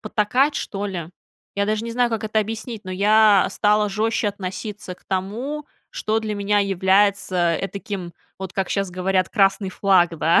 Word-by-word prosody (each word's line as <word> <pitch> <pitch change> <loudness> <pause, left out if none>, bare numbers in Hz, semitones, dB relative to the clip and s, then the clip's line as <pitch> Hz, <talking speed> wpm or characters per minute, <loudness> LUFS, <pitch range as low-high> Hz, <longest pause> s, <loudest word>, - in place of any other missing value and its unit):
потакать, 245 +7 +1
что 200 0 -3
ли. 175 -4 -5 0.4
Я 200 0 +1
даже 215 +1 -1
не 235 - -4
знаю, 245 0 +1
как 225 -1 -2
это 215 0 0
объяснить, 220 0 -5
но 185 - -7
я 205 +1 +5
стала 210 0 +2
жестче 215 +2 0
относиться 195 0 -6
к - - -29
тому, 235 +11 -3 0.2
что 225 - -1
для 215 -1 -3
меня 205 +1 +1
является 190 -2 +2
этаким, 195 -3 -5 0.3
вот 190 -1 -6
как 195 -2 -2
щас 195 -2 -1
говорят, 185 0 0
красный 195 -2 +2
флаг, 180 -4 +3
да, 165 +2 +4
200 Hz, 165 wpm, -22 LUFS, 190-215 Hz, 0.4 s, я